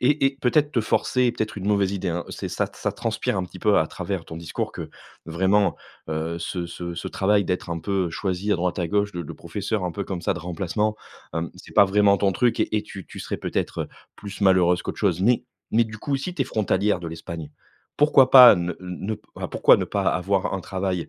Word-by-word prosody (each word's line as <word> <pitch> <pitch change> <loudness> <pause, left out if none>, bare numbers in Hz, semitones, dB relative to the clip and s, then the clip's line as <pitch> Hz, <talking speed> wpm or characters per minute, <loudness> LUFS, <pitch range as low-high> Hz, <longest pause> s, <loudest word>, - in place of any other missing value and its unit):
et 140 +3 +2
et 135 0 -2
peut-être 145 +4 +2
te 120 - +2
forcer 125 +3 +1
peut-être 110 -3 -3
une 95 - -5
mauvaise 100 -2 +2
idée, 95 -2 -2
hein 85 0 -2
c'est - - -5
ça - - -1
t - - -17
ça - - -1
transpire - - -2
un 95 - -1
petit 90 +1 -11
peu 105 +1 +3
à 80 - +2
travers 90 -1 -4
ton 80 - -9
discours 85 -1 -4
que - - -7 0.4
vraiment, 95 +5 +2 0.3
heu, 80 +2 -2
ce 85 +1 -4
ce 85 0 -6
ce 85 - -6
travail 100 +1 +2
d'être 90 -1 -2
un 85 - -2
peu 95 0 -1
choisie 95 +4 -2
à - - +2
droite 90 0 -1
à 85 - -1
gauche 100 +2 0
de 90 - -4
de - - -8
professeur, 100 -1 -3
un 90 - -2
peu 100 - -4
comme 90 -2 -5
ça, - - +1
de - - -5
remplacement, 95 +5 -2 0.4
hem, 80 0 -2
c'est - - -14
pas 100 - +8
vraiment 100 0 +4
ton 95 0 +1
truc 120 +5 +1
et 105 -1 0
tu 95 -3 -9
tu - - -9
serais - - -4
peut-être, - - -2
heu, - - -8 0.3
plus 100 0 -9
malheureuse 90 -2 +4
qu'autre - - -5
chose. 95 -4 +1
Mais 120 +4 +3 0.3
mais 115 +1 +4
du 110 -1 -9
coup 140 +3 -1
si 180 +6 -5
tu 140 - +1
es - - -4
frontalière 105 -4 +1
de 85 - -6
l'Espagne, 80 -1 -7 0.5
pourquoi 140 -3 +5
pas 125 -6 +10
ne 85 0 -2
ne 90 +4 -4 0.3
pourquoi - - +5
ne - - -1
pas - - -2
avoir 95 +1 0
un 95 - -2
travail, 95 -1 -3
95 Hz, 235 wpm, -24 LUFS, 90-105 Hz, 0.5 s, pas